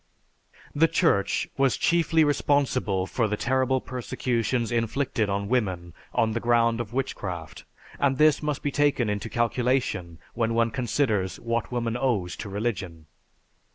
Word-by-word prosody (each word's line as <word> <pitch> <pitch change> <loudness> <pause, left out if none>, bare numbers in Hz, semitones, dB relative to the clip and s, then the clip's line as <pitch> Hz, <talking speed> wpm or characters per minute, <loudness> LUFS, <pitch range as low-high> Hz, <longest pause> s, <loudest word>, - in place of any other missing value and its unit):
"_) - - -28 0.2
The 160 +3 +4
Church 165 - +1
was 135 -2 +2
chiefly 165 -1 +3
responsible 135 -9 +1
for 115 +3 0
the 105 0 -2
terrible 130 +2 +1
persecutions 125 -1 -2
inflicted 115 -1 0
on 100 0 -1
women 95 -8 -1 0.2
on 110 - +1
the 115 - -1
ground 115 0 +2
of 110 -2 -7
witchcraft 95 -10 -4 0.3
and 135 -2 +2
this 155 -1 +4
must 150 -2 -2
be 145 - 0
taken 140 -6 +2
into 105 +2 -3
calculation 120 -7 0 0.2
when 115 -1 0
one 115 0 +2
considers 115 -6 0
what 115 0 -2
woman 120 -2 -1
owes 115 -9 0
to 100 - -6
religion. 95 -6 -3
120 Hz, 145 wpm, -26 LUFS, 105-130 Hz, 0.3 s, The